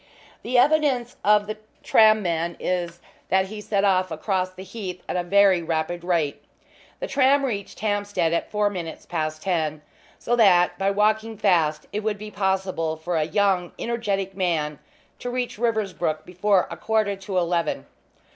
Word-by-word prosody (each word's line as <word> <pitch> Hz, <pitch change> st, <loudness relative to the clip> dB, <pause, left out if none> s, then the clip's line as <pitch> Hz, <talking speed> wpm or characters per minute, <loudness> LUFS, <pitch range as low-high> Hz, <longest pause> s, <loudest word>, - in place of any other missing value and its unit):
The 250 Hz, +1 st, 0 dB
evidence 265 Hz, -3 st, +3 dB
of 210 Hz, 0 st, +4 dB
the 215 Hz, +1 st, -5 dB, 0.3 s
tram 215 Hz, -1 st, +5 dB
men 170 Hz, -1 st, -1 dB
is 175 Hz, -1 st, -2 dB, 0.3 s
that 190 Hz, 0 st, +2 dB
he 215 Hz, 0 st, -7 dB
set 200 Hz, -1 st, 0 dB
off 185 Hz, -2 st, +2 dB
across 185 Hz, +3 st, -1 dB
the 185 Hz, 0 st, -11 dB
Heath 190 Hz, -2 st, -7 dB
at -, -, -3 dB
a 180 Hz, -, +1 dB
very 190 Hz, 0 st, +4 dB
rapid 165 Hz, +1 st, -2 dB
rate. 165 Hz, -5 st, -1 dB, 0.6 s
The -, -, -3 dB
tram 275 Hz, -, +3 dB
reached 200 Hz, -7 st, -5 dB
Hampstead 205 Hz, -5 st, 0 dB
at 170 Hz, -, -1 dB
four 210 Hz, -1 st, +1 dB
minutes 170 Hz, -4 st, -6 dB
past 155 Hz, -2 st, -3 dB
ten, 155 Hz, -5 st, -1 dB, 0.3 s
so 240 Hz, -, 0 dB
that, 180 Hz, -6 st, +5 dB
by 195 Hz, 0 st, +2 dB
walking 215 Hz, +2 st, +1 dB
fast, 165 Hz, -7 st, +2 dB
it 210 Hz, -, -1 dB
would 215 Hz, -1 st, -2 dB
be 210 Hz, +1 st, -8 dB
possible 190 Hz, -5 st, -1 dB
for 170 Hz, +2 st, -3 dB
a 155 Hz, -1 st, +1 dB
young 190 Hz, -1 st, +1 dB
energetic 200 Hz, -5 st, -2 dB
man 160 Hz, -6 st, -1 dB, 0.4 s
to 245 Hz, -, -4 dB
reach 245 Hz, -3 st, -3 dB
Riversbrook 200 Hz, -9 st, -1 dB
before 185 Hz, +1 st, +1 dB
a -, -, -6 dB
quarter 215 Hz, -2 st, 0 dB
to 195 Hz, -1 st, -4 dB
eleven. 170 Hz, -1 st, 0 dB
190 Hz, 165 wpm, -24 LUFS, 175-215 Hz, 0.6 s, tram